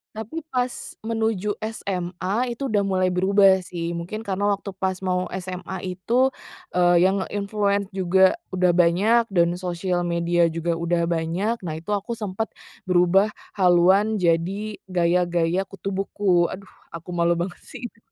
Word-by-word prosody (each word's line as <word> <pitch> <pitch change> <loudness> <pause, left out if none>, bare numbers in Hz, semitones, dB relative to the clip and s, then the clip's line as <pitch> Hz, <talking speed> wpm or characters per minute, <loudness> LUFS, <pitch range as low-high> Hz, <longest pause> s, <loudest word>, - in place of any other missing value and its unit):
Tapi 230 +9 -6
pas 250 0 +1 0.3
menuju 220 -2 -1
SMA 200 +2 -3
itu 270 +2 -4
udah 205 -2 +2
mulai 185 -1 +1
berubah 190 +1 +4
sih, 170 -1 -4
mungkin 185 +6 -5
karena 200 -1 -2
waktu 200 0 -5
pas 190 0 -2
mau 185 -1 0 0.2
SMA 185 0 -6 0.2
itu, 245 +7 +2 0.4
eee, 175 -1 +4
yang 190 +1 +2
nge-influence 200 -1 -1
juga 190 0 +3 0.2
udah 180 -1 +3
banyak 200 +8 +4
dan 175 -1 +2
sosial 180 0 -2
media 170 0 +2
juga 165 0 -1
udah 170 0 0
banyak, 170 +7 -1
nah 155 - -3
itu 160 +5 -8
aku 205 +3 -1
sempet 215 -1 -3 0.4
berubah 185 +3 +3 0.2
haluan 190 +3 +4
jadi 185 +5 0
gaya-gaya 175 0 +1
kutu 195 0 -6
buku, 195 -2 +1
aduh 190 +2 -7 0.2
aku 170 +1 -9
malu 170 -1 +2
banget 175 +1 -3
sih 265 - -10
itu. - - -33
185 Hz, 145 wpm, -23 LUFS, 175-205 Hz, 0.4 s, berubah